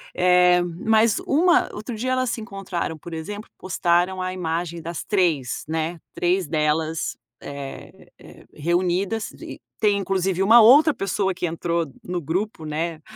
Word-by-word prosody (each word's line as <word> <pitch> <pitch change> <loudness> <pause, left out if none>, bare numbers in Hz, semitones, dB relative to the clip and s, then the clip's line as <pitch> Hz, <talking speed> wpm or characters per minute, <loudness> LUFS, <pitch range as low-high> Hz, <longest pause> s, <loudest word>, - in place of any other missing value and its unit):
eh, 180 0 +5
mas 215 +6 +2
uma 345 +5 +3
outro 220 +3 -6
dia 255 +4 -2
elas 255 -1 +1
se 225 - -3
encontraram, 195 -6 -4
por 170 +2 -10
exemplo, 205 +7 -6
postaram 180 0 0
a 185 0 -2
imagem 170 -1 -3
das 170 +1 -5
3, 165 - 0
né, 160 +1 -2
3 180 0 0
delas, 155 +1 -1 0.2
eh 140 -1 -9
eh, - - -15
reunidas 180 +6 -1
e - - -10 0.2
tem 210 -2 +3
inclusive 190 -1 -1
uma 225 +5 +7
outra 285 +7 +7
pessoa 195 0 -1
que 180 - -3
entrou 170 0 -1 0.2
no 175 -1 -3
grupo, 165 +2 -3
né, 160 +1 -3
180 Hz, 145 wpm, -23 LUFS, 165-205 Hz, 0.2 s, uma